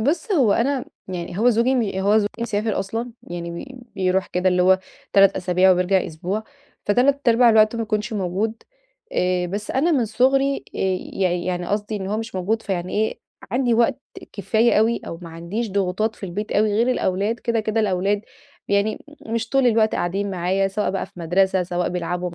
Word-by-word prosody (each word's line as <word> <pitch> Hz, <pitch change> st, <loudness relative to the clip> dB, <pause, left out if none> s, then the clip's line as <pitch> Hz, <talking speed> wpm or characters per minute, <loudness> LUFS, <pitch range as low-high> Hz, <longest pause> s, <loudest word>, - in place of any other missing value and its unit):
بُص، 315 Hz, -, 0 dB
هو 260 Hz, -, +4 dB
أنا 260 Hz, +4 st, 0 dB, 0.2 s
يعني 175 Hz, 0 st, -5 dB
هو 240 Hz, +3 st, +5 dB
زوجي 240 Hz, +3 st, +2 dB
م 245 Hz, -, +2 dB, 0.2 s
هو 205 Hz, +3 st, +3 dB
زوجي 205 Hz, -, +1 dB
مسافر 220 Hz, -2 st, -1 dB
أصلًا. 225 Hz, +5 st, -3 dB
يعني 170 Hz, -1 st, -6 dB
ب 260 Hz, -2 st, -12 dB
بيروح 185 Hz, 0 st, +1 dB
كده 180 Hz, +1 st, 0 dB
اللي 180 Hz, 0 st, +2 dB
هو 190 Hz, +1 st, +5 dB, 0.3 s
3 195 Hz, 0 st, +5 dB
أسابيع 185 Hz, 0 st, +3 dB
وبيرجع 180 Hz, +1 st, +1 dB
أسبوع، 185 Hz, +7 st, -4 dB, 0.4 s
فتلات 260 Hz, +6 st, +2 dB
أرباع 235 Hz, +1 st, +6 dB
الوقت 215 Hz, 0 st, +5 dB
ما 230 Hz, -, -1 dB
بيكونش 215 Hz, +1 st, -2 dB
موجود. 200 Hz, +3 st, -1 dB, 0.6 s
آآ 180 Hz, 0 st, +1 dB
بس 205 Hz, +4 st, -4 dB
أنا 295 Hz, +6 st, +2 dB
من 255 Hz, -6 st, +2 dB
صغري 270 Hz, +5 st, +2 dB, 0.2 s
آآ -, -, -6 dB, 0.3 s
يع 185 Hz, -2 st, +1 dB
يعني 175 Hz, 0 st, -2 dB
قصدي 205 Hz, +2 st, -2 dB
إن 190 Hz, -2 st, -4 dB
هو 210 Hz, -, -1 dB
مش 225 Hz, -1 st, -5 dB
موجود 205 Hz, +5 st, -1 dB
فيعني 180 Hz, -2 st, -3 dB
إيه، 220 Hz, +1 st, 0 dB, 0.3 s
عندي 245 Hz, -1 st, +2 dB
وقت 245 Hz, +4 st, +2 dB, 0.3 s
كفاية 220 Hz, +4 st, +2 dB
أوي، 225 Hz, +2 st, +2 dB
أو 165 Hz, -, -6 dB
ما 170 Hz, -, -8 dB
عنديش 185 Hz, +8 st, -4 dB
ضغوطات 200 Hz, +3 st, 0 dB
في 195 Hz, -, -7 dB
البيت 205 Hz, +4 st, -4 dB
أوي 210 Hz, 0 st, +2 dB
غير 235 Hz, +4 st, +2 dB
الأولاد. 205 Hz, 0 st, 0 dB
كده، 230 Hz, -1 st, 0 dB
كده 215 Hz, +1 st, 0 dB
الأولاد 200 Hz, 0 st, 0 dB, 0.5 s
يعني 200 Hz, +2 st, 0 dB, 0.2 s
مش 230 Hz, 0 st, -2 dB
طول 270 Hz, 0 st, +3 dB
الوقت 220 Hz, -2 st, +3 dB
قاعدين 195 Hz, +3 st, -1 dB
معايا 190 Hz, +2 st, 0 dB
سواء 210 Hz, +2 st, -1 dB
بقى 195 Hz, -, -3 dB
في -, -, -26 dB
مدرسة، 185 Hz, +2 st, +2 dB
سواء 175 Hz, 0 st, -2 dB
بيلعبوا 180 Hz, 0 st, -3 dB
مع -, -, -12 dB
205 Hz, 190 wpm, -22 LUFS, 185-230 Hz, 0.6 s, أرباع